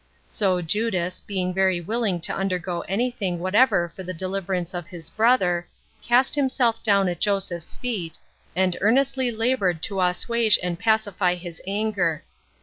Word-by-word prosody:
So 185 -4 0
Judas, 185 -1 -1
being 185 -2 -2
very 190 -1 +2
willing 200 -1 -1
to - - -2
undergo 180 -2 -2
any 240 +6 0
thing 195 -7 -3
whatever 185 0 +3
for - - -7
the 185 -1 -6
deliverance 185 0 -3
of 175 -2 -5
his 170 -5 -9
brother, 190 -7 +2 0.3
cast 245 +2 +3
himself 255 -5 +1
down 200 -3 +3
at 175 -2 -3
Joseph's 195 -5 -1
feet, 200 -10 -4 0.4
and 185 -1 +2
earnestly 260 +4 +2
labored 220 -8 0
to 195 -3 0
assuage 215 +5 +3
and 175 -1 -2
pacify 205 -5 +1
his 175 -2 -9
anger. 195 -6 -1
190 Hz, 145 wpm, -24 LUFS, 180-220 Hz, 0.4 s, whatever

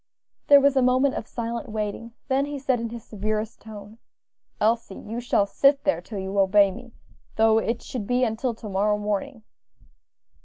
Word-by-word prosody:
There 285 -1 +8
was 280 0 +3
a 265 - +4
moment 255 +2 +3
of - - -5
silent 235 +2 -5
waiting; 215 +2 -4
then 270 +1 +1
he 290 0 -5
said 260 -2 0
in 230 0 -4
his 235 -1 -8
severest 215 +1 -4
tone, 215 0 -11 0.6
"Elsie, 220 -2 0
you 225 +3 -6
shall 235 -4 +2
sit 275 +7 +3
there 285 - +1
till 215 - -8
you 190 +1 -2
obey 195 0 +5
me, 245 +3 -12 0.4
though 220 0 +4
it 230 +1 -2
should 220 -6 -6
be 250 +1 +1
until 230 +1 -1
to 220 - -9
morrow 205 +1 +1
morning." 210 +4 -3
225 Hz, 180 wpm, -24 LUFS, 210-255 Hz, 0.6 s, There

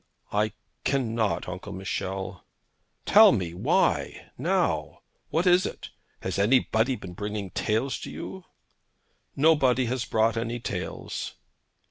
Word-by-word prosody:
'I 105 +1 +1 0.3
can 130 -5 0
not, 110 -3 0
Uncle 90 0 -6
Michel.' 95 -1 -4 0.6
'Tell - - +8
me 85 -3 -2
why, 90 - 0
now. - - 0 0.3
What 165 +3 +1
is 180 0 +5
it? - - -6 0.3
Has 95 0 -2
anybody 115 +2 +3
been 95 -6 -9
bringing 105 0 -4
tales 115 +5 0
to - - -7
you?' 190 -1 -7 0.9
'Nobody 135 -4 +4
has 125 0 -1
brought 110 +1 +2
any 115 +1 -2
tales.' - - -5
110 Hz, 120 wpm, -27 LUFS, 95-130 Hz, 0.9 s, Tell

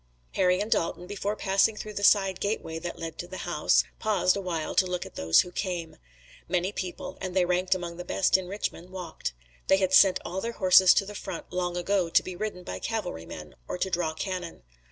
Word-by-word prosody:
Harry 180 0 +3
and 210 +2 -3
Dalton, 170 +1 0
before 205 +2 -3
passing 195 +2 +2
through 215 0 -7
the 200 - -4
side 195 -2 +4
gateway 200 -6 -2
that 175 +1 -6
led 165 -1 -6
to 175 - -5
the 185 - -7
house, 165 -4 +3 0.2
paused 195 -4 +2
awhile 180 -5 -3
to 185 - +3
look 180 -1 -3
at - - -11
those 80 0 +4
who 180 - -8
came. 175 -4 -4 0.5
Many 180 +2 0
people, 240 +9 -6
and 185 -1 -4
they 185 -2 +4
ranked 180 +1 +1
among 175 -2 -5
the 180 - -5
best 185 +1 +2
in 190 -1 +1
Richmond, 185 -2 -4
walked. 175 - -5 0.3
They 190 - +5
had 190 -1 0
sent 190 -1 +7
all 185 +2 -3
their 235 +2 -3
horses 185 -2 +6
to 195 - +2
the 210 - -8
front 180 -4 -7
long 180 -1 -1
ago 180 -1 +1
to - - +4
be 185 - -6
ridden 195 -2 -4
by - - -6
cavalrymen 80 - -5
or - - -3
to 190 +1 -2
draw 170 -3 -1
cannon. 180 - -5
185 Hz, 215 wpm, -27 LUFS, 175-195 Hz, 0.5 s, sent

